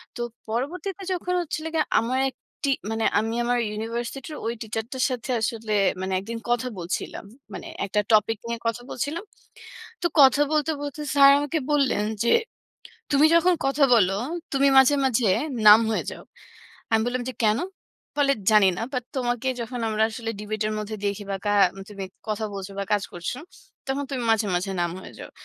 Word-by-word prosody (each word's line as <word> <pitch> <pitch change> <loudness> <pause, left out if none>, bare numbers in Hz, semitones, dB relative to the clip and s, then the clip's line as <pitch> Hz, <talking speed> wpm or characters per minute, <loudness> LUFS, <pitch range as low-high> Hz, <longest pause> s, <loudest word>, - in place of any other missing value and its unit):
তো - - -5 0.3
পরবর্তীতে 355 - -3
যখন 360 0 -2
হচ্ছিল 315 -1 -4
গিয়ে 315 -2 +2
আমার 245 +3 -1
১ 260 - -17 0.3
টি, 280 - +2 0.2
মানে 225 0 -1
আমি 225 +1 -2
আমার 245 +1 +1
ইউনিভার্সিটি'র 235 +7 -5
ঐ - - 0
টিচার 225 0 -3
টার 260 -1 -1
সাথে 255 0 -5
আসলে 225 -1 -2 0.3
মানে 190 0 -2
একদিন 225 +4 -6
কথা 240 +1 +1
বলছিলাম। 175 +2 -4 0.3
মানে - - -7 0.2
একটা 205 +1 0
টপিক 220 +1 +4
নিয়ে 235 0 -3
কথা 230 +1 -1
বলছিলাম। 300 - -3 0.8
তো - - +2
কথা 275 +1 +7
বলতে, 305 0 +2
বলতে 290 +1 -5
স্যার 275 -1 +8
আমাকে 290 +3 -1
বললেন 275 -8 +2 0.2
যে, 235 - +2 0.8
তুমি 290 +2 +5
যখন 350 +2 +5
কথা 275 +1 +3
বলো, 195 -4 +4 0.4
তুমি 275 0 +4
মাঝে, 265 +2 +6
মাঝে 250 -3 +2 0.4
নাম্ব 215 +2 +9
হয়ে - - -1
যাও। - - -9 0.7
আমি 225 -1 +4
বললাম 245 +1 -1
যে, - - -3
"কেন?" 215 +1 +3 0.6
বলে 280 -1 +3
যে - - -11
"জানি 210 -3 +6
না। - - -3
বাট 250 -2 -2
তোমাকে 245 0 -1
যখন 235 +2 -5
আমরা 215 0 0
আসলে 225 0 -4
ডিবেট 215 0 -3
এর 215 - -1
মধ্যে 215 +1 -4
দেখি 200 +1 -2
বা 195 - -1
কা - - +2 0.4
তুমি 200 -2 -6 0.2
কথা 215 0 -1
বলছ 195 -1 -5
বা 200 - -1
কাজ 205 -1 +2
করছ, 175 -1 -4 0.6
তখন 275 +1 -1
তুমি 260 -3 -2
মাঝে, 220 -1 +2
মাঝে 180 +3 -1
নাম্ব 170 0 -1
হয়ে - - -11
যাও।" - - -9
235 Hz, 180 wpm, -25 LUFS, 215-275 Hz, 0.8 s, নাম্ব